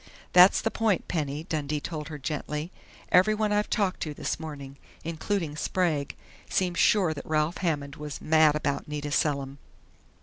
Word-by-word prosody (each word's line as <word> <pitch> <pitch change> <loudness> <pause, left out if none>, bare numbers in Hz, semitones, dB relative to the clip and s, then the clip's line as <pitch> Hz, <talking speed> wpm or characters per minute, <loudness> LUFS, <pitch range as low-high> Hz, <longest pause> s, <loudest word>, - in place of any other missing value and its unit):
"That's 180 +2 +7
the 225 - -1
point, 220 -5 0
Penny," 150 -2 -2
Dundee 150 -3 -2
told 150 -1 -5
her 155 -2 -6
gently. 150 +3 -4 0.4
"Everyone 210 +3 +4
I've 210 0 +1
talked 200 -4 0
to 150 -2 -4
this - - -3
morning, 140 -4 -8 0.3
including 165 0 -2
Sprague, 155 -3 -1 0.3
seems 180 -2 0
sure 185 -6 +4
that 145 - -7
Ralph 155 +2 0
Hammond 145 -5 -2
was 150 -2 -6
mad 155 -1 +4
about 145 -2 -2
Nita 150 -1 -4
Selim." 140 -2 0
155 Hz, 155 wpm, -27 LUFS, 145-180 Hz, 0.4 s, That's